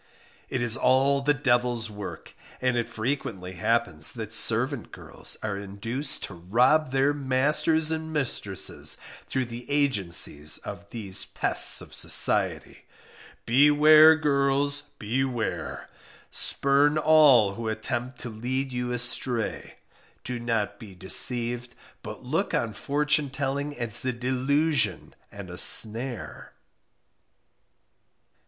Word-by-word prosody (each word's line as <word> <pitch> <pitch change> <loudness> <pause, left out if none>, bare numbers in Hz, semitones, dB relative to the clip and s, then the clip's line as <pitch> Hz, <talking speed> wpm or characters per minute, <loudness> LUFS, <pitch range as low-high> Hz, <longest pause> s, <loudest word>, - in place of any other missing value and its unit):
It 125 - -3
is 120 -1 +2
all 135 +2 +2
the 145 +2 +1
devil's 120 -4 0
work; 105 -1 -9 0.3
and 130 -1 0
it 120 -1 -2
frequently 110 -6 -4
happens 95 -5 +1
that 110 -2 -7
servant 120 +3 +2
girls - - -5
are 105 -2 -3
induced 115 +8 -3
to - - -6
rob 125 - +1
their 135 +2 +1
masters 145 +4 0
and 160 0 -4
mistresses 120 -10 -3 0.3
through 130 -1 -2
the 120 +2 -10
agency 105 - -1 0.2
of 100 - -9
these 100 -5 -7
pests - - +4
of - - -12
society. - - +1 0.6
Beware! 150 +5 +6
girls, 140 -1 0 0.2
beware! 120 +1 -4 0.4
spurn 140 +2 +2
all 150 -10 +4
who 115 +2 -6
attempt 120 +3 -4
to 120 - -6
lead 130 +5 -4
you 125 0 -4
astray; 120 -1 -3 0.5
do 125 -1 -5
not 110 -3 -3
be 100 -4 -12
deceived, 120 +6 +3 0.3
but - - -10
look - - -2
on 115 -2 -2
fortune 145 +5 0
telling 140 +2 -4
as 120 -2 0
a 130 - -1
delusion 130 +5 -1 0.2
and - - -10
a - - -7
snare. 115 +2 +3
125 Hz, 115 wpm, -25 LUFS, 115-140 Hz, 0.6 s, Beware